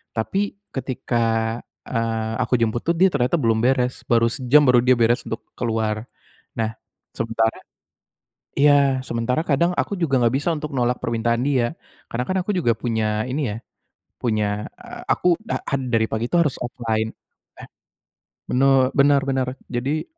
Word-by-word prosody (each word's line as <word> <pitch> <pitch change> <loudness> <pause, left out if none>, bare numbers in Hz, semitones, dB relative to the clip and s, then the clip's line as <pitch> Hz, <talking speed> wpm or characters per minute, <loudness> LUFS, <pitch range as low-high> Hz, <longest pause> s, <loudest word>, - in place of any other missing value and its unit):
Tapi 195 - -1 0.2
ketika, 115 -3 -1 0.3
eee, 115 -2 -1
aku 125 0 +1
jemput 115 +1 +1
tuh 170 - +2
dia 190 +3 +6
ternyata 130 +2 +2
belum 115 -3 +2
beres. 125 0 +1
Baru 115 -1 +4
sejam, 135 +3 +4
baru 125 -1 +6
dia 130 0 +5
beres 120 +1 +3
untuk 115 - -5
keluar. 110 -1 -1 0.5
Nah, 110 -1 -1 0.4
sementara 115 0 0 1.0
iya, 140 -2 +4
sementara 120 +6 -1
kadang 170 +5 +2
aku - - -1
juga 145 -6 +2
enggak 120 +2 +3
bisa 145 - -2
untuk 150 0 -5
nolak 125 0 +1
permintaan 115 +1 0
dia. 130 -2 +1 0.4
Karena 125 +2 -2
kan 185 - 0
aku 200 - -4
juga 120 -10 +2
punya 110 -2 -1
ini 135 -2 -1
ya, - - -6 0.7
punya, 105 -3 0
eee, - - -10
aku 175 -1 +3
da - - -3
ad 140 -1 -1
dari 110 -1 +3
pagi 110 +2 -1
itu - - +2
harus 150 -5 +1
offline. 110 -3 -2 1.4
Bener 135 0 +4
bener 140 0 +5
bener. 130 -1 0 0.2
Jadi 135 +6 -1
120 Hz, 150 wpm, -22 LUFS, 115-140 Hz, 1.4 s, dia